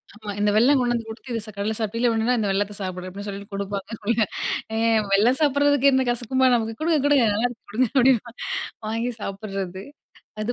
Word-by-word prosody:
ஆமா, 210 -1 -7
இந்த 205 0 +3
வெல்லம் 265 +6 +5
கொண்டு 240 -1 +1
வந்து 230 -1 -2
குடுத்து 240 +3 -9
"இது 230 - -1
சா 215 - -9
கடல 210 +2 -1
சாப்ட்டீல்ல! 230 +3 0
உடனே 225 +3 +1
இந்த 205 -2 0
வெல்லத்த 205 +1 -1
சாப்பிடு." 185 -1 -5
அப்டின்னு 200 +3 -8
சொல்லிட்டு 200 +1 -7
குடுப்பாங்க 200 0 -4
அதுபோல. 220 +1 0 0.5
ஆ - - -1 0.4
வெல்லம் 230 +7 +4
சாப்டுறதுக்கு 285 -1 +4
என்ன 260 0 +2
கசக்குமா 255 +2 +1
நமக்கு? 225 -1 -2
"குடுங்க 320 0 +2
குடுங்க 285 -5 +4
நல்லா 225 +4 +1
இருக்கும், 240 - -14
குடுங்க" 245 0 +2
அப்டின்னு 250 -2 +4 0.6
வாங்கி 230 +3 -1
சாப்டுறது. 195 -2 -5 0.6
அது 240 +3 -1
225 Hz, 190 wpm, -23 LUFS, 200-250 Hz, 0.6 s, வெல்லம்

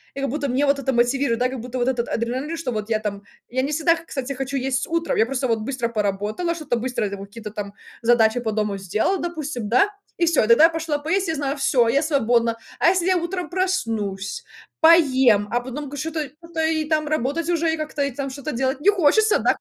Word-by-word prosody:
и 275 - -4
как 275 - -1
будто 285 +2 -2
мне 265 +4 +1
вот 280 0 +2
это 265 -1 -1
мотивирует, 240 0 +1
да, 250 +1 +2
как 260 -1 -5
будто 250 +2 -6
вот 245 +1 +2
этот 240 -2 -1
адреналин 255 +7 -2
что 320 -6 -3
вот 215 -1 -4
я 220 -1 +1
там 205 -2 -4 0.3
Я 260 +2 -1
не 280 - -2
всегда 330 +2 +3
кстати 275 -5 -5
хочу 270 +1 -4
есть 265 0 -1
утром, 335 0 -1
я 220 - +4
просто 260 +1 -2
вот 225 -1 +1
быстро 240 0 -2
поработала, 210 - -1
что-то 300 -7 -2
быстро 245 -1 -2
это 200 0 -4
какие-то 205 +2 -9
там 200 -1 -6 0.3
задачи 230 0 +4
по 230 -2 -2
дому 210 -2 -1
сделала, 215 - 0
допустим, 305 -9 -4
да, 255 - +4 0.3
и 345 - +2
всё 315 -9 +3
тогда 270 +8 +7
пошла 320 -2 -2
поесть, 340 +6 -1
я 320 - -1
знаю- 280 -1 -2
всё 265 -4 +3
я 275 +4 +3
свободна. 235 -6 +1 0.2
А - - +5
если 360 -1 +1
я 370 -1 +3
утром 350 +1 -3
проснусь, 225 - -2 0.4
поем, 265 -10 +5
а 240 - +2
потом 265 +3 -6
к 290 - -7
что-то 320 +2 -3 0.4
и 315 -1 0
там 305 0 0
работать 310 +3 -1
уже 335 -1 +1
и - - -2
как-то 300 -2 -2
там 275 -1 -3
что-то 285 +3 -5
делать 265 +3 -1
не 395 - +5
хочется, 410 +3 +4
да. - - +2
270 Hz, 220 wpm, -22 LUFS, 235-320 Hz, 0.4 s, тогда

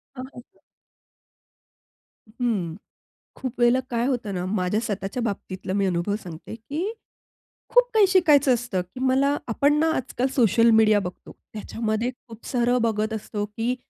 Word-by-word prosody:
हां, 255 - -6
हां, 245 - -10
हां. 390 - -36 1.7
हं, 240 +3 -5
हं. 185 -9 -1 0.6
खूप 255 -2 -6
वेळेला 240 +1 +4
काय 235 0 0
होतं 245 -6 -2
ना, 180 -1 -3
माझ्या 185 +1 0
स्वतःच्या 205 +2 -3
बाबतीतला 190 -4 -4
मी 200 0 +1
अनुभव 180 +2 0
सांगते, 170 +4 -9
की 305 - -4 0.8
खूप - - +4
काही 430 -3 +5
शिकायचं 300 -8 +5
असतं, 235 -6 -1
की 180 +8 -11
मला 275 +2 +3
आपण 280 +5 +2
ना, 320 +1 +3
आजकाल 255 0 -1
सोशल 230 -1 +4
मीडिया 215 -1 +5
बघतो. 180 -2 -8 0.2
त्याच्यामध्ये 220 +2 -2 0.2
खूप 225 -1 -13
सारं 245 -1 +1
बघत 220 -1 0
असतो. 210 -1 -4
की 225 +4 -2
230 Hz, 150 wpm, -24 LUFS, 205-255 Hz, 1.7 s, काही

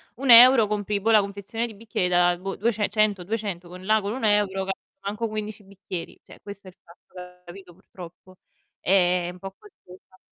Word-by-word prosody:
1€ 245 -2 +7
compri, 205 -1 -2
boh, 225 - -1
la 215 -2 +5
confezione 200 +4 -5
di 225 - -9
bicchieri 205 -3 -3
da, 175 0 +2
boh, 195 +2 -6
duece 215 -2 -1
cento, 205 -3 0
200 200 -4 -5
con 180 +1 -12
là 215 +2 +2
con 200 0 -5
1€ 205 -5 0
ca 195 - -2 0.3
manco 210 +3 -4
15 215 -1 -7
bicchieri. 190 -3 -9
Cioè - - -16
questo 200 -1 -11
è - - -8
il 180 - -35
fatto, 180 +1 -15
capito, 175 0 -13
purtroppo. 185 0 -15 0.4
È 180 -2 +1
un 180 - -15
po' 195 +1 -9
costosa. 185 - -19
195 Hz, 180 wpm, -24 LUFS, 180-215 Hz, 0.4 s, 1€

